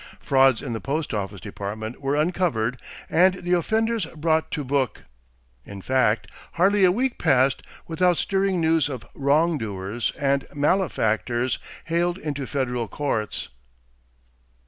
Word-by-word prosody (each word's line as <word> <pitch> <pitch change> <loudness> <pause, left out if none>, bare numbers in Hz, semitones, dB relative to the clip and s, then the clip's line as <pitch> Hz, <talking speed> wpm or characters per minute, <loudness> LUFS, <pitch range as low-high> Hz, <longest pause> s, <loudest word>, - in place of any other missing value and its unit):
Frauds 135 -3 +3
in 130 -5 -4
the 115 - -4
Post 150 0 -2
office 100 -1 -3
Department 110 +3 -6
were 140 +1 0
uncovered 150 -8 0 0.3
and 185 +2 +4
the 180 0 -2
offenders 220 +5 +1
brought 160 0 +1
to 150 - -3
book. 135 -2 -1 0.6
In 100 +6 -9
fact 120 0 +1 0.3
hardly 195 +3 +3
a 180 - +6
week 250 +6 -1
passed 135 -3 +3 0.3
without 175 +1 +2
stirring 195 -2 +1
news 160 -3 +2
of 130 -5 -6
"wrong 150 +3 +2
doers" 105 +1 -3
and 140 -1 +1
"malefactors" 125 - +1 0.3
haled 175 +2 0
into 145 -6 -4
federal 125 -4 -2
courts. 110 -8 -3
145 Hz, 130 wpm, -24 LUFS, 120-175 Hz, 0.6 s, a